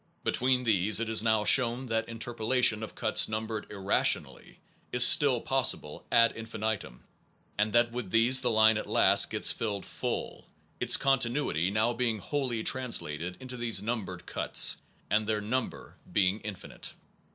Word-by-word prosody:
Between 125 Hz, 0 st, 0 dB
these 105 Hz, -2 st, +2 dB
it 115 Hz, -1 st, -3 dB
is 110 Hz, -1 st, +3 dB
now 110 Hz, -1 st, +1 dB
shown 125 Hz, +1 st, +5 dB
that 115 Hz, -2 st, -3 dB
interpolation 115 Hz, 0 st, 0 dB
of 110 Hz, -, -8 dB
cuts 110 Hz, -2 st, +1 dB
numbered 110 Hz, 0 st, -5 dB
irrationally 100 Hz, -1 st, -1 dB, 0.3 s
is -, -, +7 dB
still -, -, +5 dB
possible -, -, -2 dB
ad 115 Hz, 0 st, +4 dB
infinitum, 110 Hz, -, -5 dB, 0.5 s
and 105 Hz, +1 st, -1 dB
that 120 Hz, 0 st, +2 dB
with 120 Hz, -5 st, -6 dB
these 120 Hz, +5 st, +4 dB
the 125 Hz, -, 0 dB
line 110 Hz, -1 st, +3 dB
at -, -, -8 dB
last -, -, +4 dB
gets -, -, +1 dB
filled 105 Hz, -4 st, -4 dB
full, -, -, -6 dB, 0.3 s
its -, -, +4 dB
continuity 125 Hz, -, 0 dB
now 110 Hz, +4 st, 0 dB
being 115 Hz, -2 st, -1 dB
wholly 120 Hz, +1 st, -4 dB
translated 90 Hz, -, -2 dB
into 130 Hz, -1 st, -8 dB
these 115 Hz, -4 st, -1 dB
numbered 100 Hz, -6 st, -5 dB
cuts, -, -, -1 dB, 0.3 s
and 105 Hz, 0 st, +1 dB
their 110 Hz, -1 st, -1 dB
number 115 Hz, +4 st, -5 dB
being 95 Hz, +1 st, +1 dB
infinite. 105 Hz, -4 st, -8 dB
110 Hz, 150 wpm, -28 LUFS, 105-120 Hz, 0.5 s, is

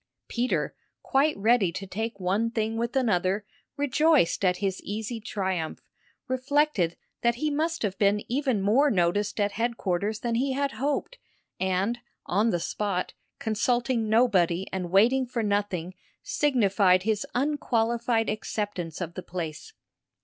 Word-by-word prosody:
Peter, 245 Hz, +2 st, -1 dB, 0.3 s
quite 290 Hz, +3 st, +2 dB
ready 210 Hz, -3 st, +3 dB
to 195 Hz, -, -6 dB
take 220 Hz, +2 st, -4 dB
one 195 Hz, +5 st, +1 dB
thing 225 Hz, -1 st, -1 dB
with 235 Hz, +2 st, -2 dB
another, 205 Hz, -5 st, +1 dB, 0.3 s
rejoiced 290 Hz, -, +3 dB
at 180 Hz, -1 st, +3 dB
his 190 Hz, -1 st, -2 dB
easy 220 Hz, +3 st, -4 dB
triumph, 190 Hz, -6 st, -2 dB, 0.5 s
reflected 260 Hz, -, +1 dB, 0.2 s
that 235 Hz, -1 st, +2 dB
he 300 Hz, +5 st, -1 dB
must 320 Hz, +1 st, -1 dB
have 195 Hz, -3 st, -1 dB
been 205 Hz, 0 st, +3 dB
even 255 Hz, -5 st, 0 dB
more 255 Hz, +9 st, +4 dB
noticed 200 Hz, 0 st, +1 dB
at 205 Hz, 0 st, +2 dB
headquarters 215 Hz, -2 st, -1 dB
than 235 Hz, -1 st, -1 dB
he 260 Hz, +3 st, +1 dB
had 280 Hz, +1 st, 0 dB
hoped, 290 Hz, -, -2 dB, 0.4 s
and, 190 Hz, +5 st, 0 dB, 0.3 s
on 210 Hz, +5 st, +2 dB
the 175 Hz, -, +1 dB
spot, 195 Hz, +1 st, -2 dB, 0.2 s
consulting 235 Hz, +1 st, 0 dB
nobody 195 Hz, -6 st, +3 dB
and 185 Hz, -2 st, -2 dB
waiting 240 Hz, +8 st, +4 dB
for 235 Hz, -2 st, -2 dB
nothing, 200 Hz, -4 st, -1 dB, 0.3 s
signified 200 Hz, -9 st, +3 dB
his 215 Hz, 0 st, 0 dB
unqualified 235 Hz, -4 st, +1 dB
acceptance 205 Hz, -6 st, -3 dB
of 170 Hz, -1 st, -4 dB
the 185 Hz, -, -6 dB
place. 170 Hz, -4 st, -6 dB
220 Hz, 135 wpm, -27 LUFS, 190-245 Hz, 0.5 s, more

